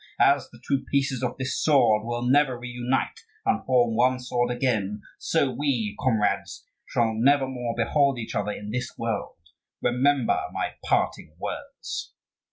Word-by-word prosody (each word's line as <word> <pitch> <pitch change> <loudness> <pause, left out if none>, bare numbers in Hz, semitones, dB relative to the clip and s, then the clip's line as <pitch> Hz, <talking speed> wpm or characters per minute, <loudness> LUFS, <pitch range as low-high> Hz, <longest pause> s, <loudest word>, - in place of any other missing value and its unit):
As - - +4
the - - -16
two 140 -1 +1
pieces 135 -3 +1
of 125 - -2
this 130 -1 -2
sword 120 -8 +4
will 120 0 -2
never 130 0 +3
reunite 125 +1 -2 0.3
and - - +1
form 120 -3 +3
one 125 +2 +3
sword 125 -1 0
again, 110 -5 -1 0.2
so 145 -5 +1
we, 120 -6 -1
comrades, 105 -6 0 0.2
shall 115 -2 +1
nevermore 130 -1 +1
behold 140 +3 +2
each 115 - -5
other 105 0 -1
in 105 0 -6
this 125 +2 -3
world. 115 -3 -3 0.4
Remember 130 +1 +2
my - - -2
parting 75 - 0
words." - - -6
125 Hz, 145 wpm, -26 LUFS, 115-130 Hz, 0.4 s, As